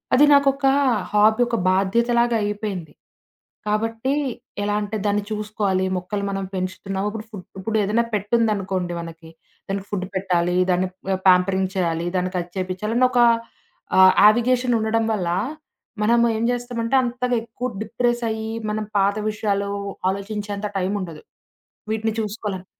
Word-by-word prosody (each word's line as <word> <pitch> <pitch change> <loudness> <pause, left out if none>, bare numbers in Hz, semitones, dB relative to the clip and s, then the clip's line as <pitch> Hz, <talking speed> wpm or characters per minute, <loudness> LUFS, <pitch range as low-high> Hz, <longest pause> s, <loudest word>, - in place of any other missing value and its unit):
అది 285 +4 +7
నాకొక 275 -1 +3 0.5
హాబీ 215 +3 +4
ఒక 235 - 0
బాధ్యతలాగా 235 +5 +2
అయిపోయింది. 205 -6 -4 0.7
కాబట్టి, 225 +5 0 0.5
ఎలా 205 0 0
అంటే 205 +1 -4
దాన్ని 205 0 +1
చూసుకోవాలి 210 -3 -1
మొక్కలు 200 +3 -4
మనం 195 0 -3
పెంచుతున్నాము. 190 +2 -3
ఇప్పుడు 215 0 -7
ఫుడ్ 200 -4 -9
ఇప్పుడు 220 +3 -1
ఏదన్నా 220 +4 +1
పెట్ 205 0 -2
ఉందనుకోండి 195 -5 0
మనకి 165 -1 -10 0.4
దానికి 195 0 -3
ఫుడ్ 190 -3 -2
పెట్టాలి, 180 -2 +1 0.2
దాన్ని 180 +1 +1 0.3
ఆ! - - +2
ప్యాంపరింగ్ 190 +1 +4
చేయాలి, 170 -2 0
దాన్ని 185 0 0
కచ్ 175 0 -4
చేపించాలని 210 +7 0
ఒకా 240 -1 +5 0.7
ఆహ్, 190 0 +8
యావిగేషన్ 245 +3 +4
ఉండడం 220 +1 +1
వల్ల 180 -5 -1 0.7
మనం 235 +3 +4 0.2
ఏం 220 - -1
జేస్తామంటే 245 0 -1
అంతగా 250 0 -1
ఎక్కువ 235 +2 -5
డిప్రెసయి 225 0 -1 0.2
మనం 215 0 -2
పాత 200 +1 +3
విషయాలు 205 -1 -1 0.4
ఆలోచించేంత 205 +1 -4
టైమ్ 190 +1 -1
ఉండదు 165 -4 -7 0.7
వీటిని 220 0 -1
చూసుకోవాలని. 205 -3 -4
210 Hz, 130 wpm, -22 LUFS, 190-225 Hz, 0.7 s, ఆహ్